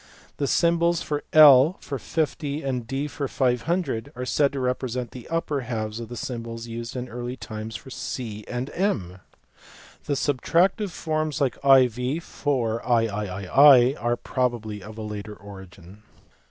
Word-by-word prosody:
The 140 - -1
symbols 170 +2 +2
JL 150 +1 +6
for 140 -2 -5
50 150 -1 -2
and 125 -4 -3
D 135 +3 -2
for 140 -1 -4
500 130 0 -1
are 125 +1 -4
said 140 +2 +2
to 140 - -3
represent 125 -1 -2
the 125 -2 -10
upper 160 -4 -1
jhalves 110 -3 -4
of 115 -2 -7
the 120 - -7
symbols 115 -1 -5
used 115 +1 -6
in 125 0 -4
early 120 +1 -6
times 110 -1 -7
for 130 +6 -9
c 110 -5 -5
and 125 +3 -4
M. 100 - -1 0.9
The 145 - -1
Isubtractive 170 - +1
forms 155 -3 -2
like 135 -3 +1
iv 130 +2 +4
for 115 -6 -1
mi 115 +4 +4
are 120 -2 -1
probably 120 -5 -2
of 105 +3 -10
a 110 - -5
later 105 0 -6
origin. 95 -1 -13
125 Hz, 145 wpm, -25 LUFS, 115-145 Hz, 0.9 s, JL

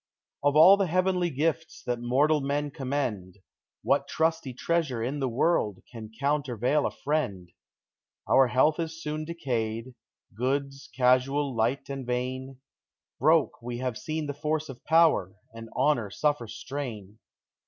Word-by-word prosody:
Of 145 0 +2
all 175 +6 +8
the 195 -2 +1
heavenly 180 +1 +1
gifts 160 +2 -2
that 120 -1 -1
mortal 145 +5 +2
men 145 +1 -1
com 135 -3 -6
mend, 105 -10 -2 0.5
What - - +2
trusty 160 -3 0
treasure 135 -3 -1
in 135 +5 -2
the 135 -2 0
world 115 - 0
can 110 -3 -8
counter 140 -3 0
vail 140 +6 +2
a - - -2
friend? 100 - -3 0.8
Our 135 -1 +5
health 130 +6 +2
is 165 0 -4
soon 155 -1 -4
decayed; 125 -7 -3 0.4
goods, 135 +3 -2
casual, 130 +2 +2
light 120 +5 0
and 135 -1 -5
vain; 130 +2 -4 0.6
Broke 155 +2 +3
have 125 +1 -3
we - - -9
seen 155 0 -3
the 145 - -3
force 155 +1 -2
of 130 - -10
power, 160 - +3 0.2
and 115 0 -9
honor 120 -9 +2
suffer 145 -1 0
stain. 110 -4 -7
135 Hz, 145 wpm, -27 LUFS, 120-155 Hz, 0.8 s, all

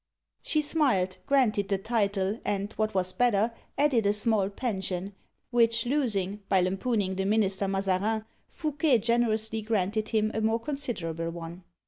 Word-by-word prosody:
She 305 -1 +1
smiled, 255 - +1
granted 220 -8 +2
the 200 - +2
title, 205 -1 -1
and, 200 +1 -2
what 215 -2 -1
was 185 -1 0
better, 230 -2 +2 0.2
added 260 -8 +3
a 205 - +3
small 210 -2 +2
pension, 195 -4 -3 0.4
which 230 -1 +3
losing, 210 -8 0
by 190 - +4
lampooning 195 +2 0
the 190 - -1
minister 200 -2 +1
Mazarin, 195 +3 0 0.2
Fouquet 300 -4 +1
generously 225 -1 +1
granted 215 0 -1
him 215 -1 +1
a 220 - -1
more 220 +1 +1
considerable 225 - -3
one. 170 +1 -8
215 Hz, 140 wpm, -28 LUFS, 195-235 Hz, 0.4 s, by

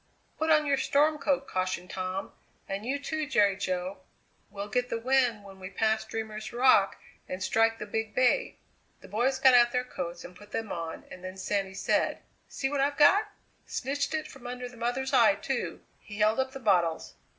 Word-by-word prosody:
"Put 315 +1 0
on 305 -1 +5
your 280 -1 +2
storm 300 +2 +2
coat," 275 -1 0
cautioned 185 -1 -2
Tom, 185 +1 -4 0.4
"and 195 +4 -4
you, 275 +2 0
too, 310 +1 -3
Jerry 205 -8 +3
Jo; 185 0 -3 0.5
we'll 200 0 -6
get 245 +3 -1
the - - -1
wind 245 -3 +2
when 195 -1 -13
we 185 0 -7
pass 220 +1 +1
Dreamer's 220 -1 -5
Rock 240 -5 +4 0.3
and 185 +1 -4
strike 225 +3 +2
the 210 - -6
Big 220 +1 -3
Bay." 255 - +2 0.4
The - - -12
boys 245 +7 +1
got 265 -1 +6
out 240 -1 +6
their 250 0 0
coats 175 -8 -6
and 180 - -11
put 205 +3 -15
them 225 -3 -3
on, 165 -1 -5
and 185 - -10
then 185 +1 -7
Sandy 195 0 -2
said: - - +1 0.3
"See 270 - -2
what 280 0 -1
I've 285 +1 +1
got! 400 +8 +5 0.4
Snitched 280 +4 -2
it 310 - -3
from 250 -2 -11
under 250 0 -5
the 245 - -13
mother's 245 +3 -2
eye, - - +6
too!" - - -3 0.2
He 205 - -10
held 215 +3 +3
up 265 0 -1
the 270 - -6
bottles. 180 -8 +1
225 Hz, 195 wpm, -29 LUFS, 195-265 Hz, 0.5 s, got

